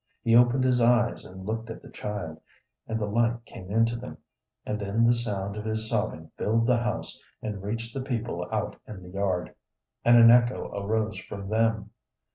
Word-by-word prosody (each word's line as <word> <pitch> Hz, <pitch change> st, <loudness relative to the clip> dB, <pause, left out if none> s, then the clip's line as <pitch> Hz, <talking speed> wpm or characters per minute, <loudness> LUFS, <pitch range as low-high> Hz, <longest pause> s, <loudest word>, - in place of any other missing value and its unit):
He 115 Hz, -1 st, +4 dB
opened 125 Hz, +2 st, +5 dB
his 125 Hz, -1 st, +3 dB
eyes 120 Hz, 0 st, +3 dB
and 95 Hz, +1 st, -10 dB
looked 110 Hz, +2 st, -3 dB
at 115 Hz, -, -8 dB
the -, -, -12 dB
child, 100 Hz, -7 st, -5 dB, 0.5 s
and 110 Hz, 0 st, -2 dB
the 105 Hz, -, 0 dB
light 115 Hz, +2 st, 0 dB
came 95 Hz, -4 st, -11 dB
into 115 Hz, +3 st, +2 dB
them, 125 Hz, +2 st, -7 dB, 0.5 s
and 105 Hz, -, -2 dB
then 105 Hz, +3 st, +1 dB
the 120 Hz, -, +5 dB
sound 100 Hz, -4 st, -3 dB
of 105 Hz, -, -5 dB
his 110 Hz, 0 st, -2 dB
sobbing 105 Hz, -8 st, -2 dB
filled 115 Hz, +2 st, +2 dB
the 125 Hz, 0 st, +4 dB
house 120 Hz, +1 st, -3 dB, 0.2 s
and 105 Hz, -3 st, -5 dB
reached 115 Hz, +3 st, -4 dB
the 135 Hz, -, -3 dB
people 115 Hz, -9 st, -3 dB
out -, -, -2 dB
in 100 Hz, -4 st, -9 dB
the 90 Hz, -, -11 dB
yard, 95 Hz, -2 st, -1 dB, 0.5 s
and 120 Hz, 0 st, +7 dB
an 115 Hz, 0 st, +9 dB
echo 120 Hz, +1 st, +3 dB
arose 110 Hz, +2 st, -1 dB
from 100 Hz, -1 st, -7 dB
them. 110 Hz, 0 st, +1 dB
110 Hz, 190 wpm, -27 LUFS, 100-120 Hz, 0.5 s, an